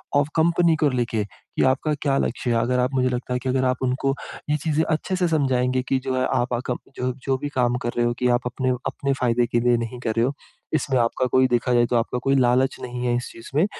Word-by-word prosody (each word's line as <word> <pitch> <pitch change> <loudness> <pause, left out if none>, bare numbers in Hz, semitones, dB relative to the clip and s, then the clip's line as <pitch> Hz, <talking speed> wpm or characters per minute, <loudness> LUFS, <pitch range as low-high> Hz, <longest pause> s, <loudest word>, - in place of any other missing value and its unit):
और 145 0 +4
कंपनी 170 0 +3
को 150 - +5
लेके 120 -4 -1 0.3
कि - - +3
आपका 135 +4 +1
क्या 140 -2 +1
लक्ष्य 120 +1 -2
है? - - +2
अगर 125 +1 +1
आप, 125 +2 0
मुझे 130 -1 +2
लगता 125 0 -3
है 125 - 0
कि 130 +1 -3
अगर 130 0 +1
आप 130 0 +1
उनको 130 +2 0 0.4
ये 150 - +2
चीज़ें 155 +1 0
अच्छे 160 +4 -1
से 180 -1 +2
समझाएँगे 130 -4 +1
कि 135 - +3
जो 130 -1 -1
है, 130 0 +1
आप 125 -1 0
आ 120 - 0
कम 125 - -1 0.2
जो 125 0 -1
जो 135 -1 +1
भी 145 +2 -4
काम 125 -3 +1
कर 120 - -1
रहे 120 - +3
हो 120 - +1
कि 125 - +2
आप 120 0 +2
अपने 130 +1 -2 0.2
अपने 140 0 -1
फ़ायदे 120 -1 +2
के 120 - +1
लिए 120 0 +3
नहीं 115 +1 -5
कर 115 - -2
रहे 115 - +4
हो। 135 - -1 0.4
इसमें 135 -4 +1
आपका 115 +2 +1
कोई, 130 0 +4
देखा 125 0 +1
जाए, 120 0 +4
तो 120 - -1
आपका 115 +2 -1
कोई 135 0 +2
लालच 130 0 +3
नहीं 125 0 -5
है 120 -1 +1
इस 125 - -5
चीज़ 115 - -12
में। 155 +5 +4
125 Hz, 265 wpm, -23 LUFS, 120-135 Hz, 0.4 s, को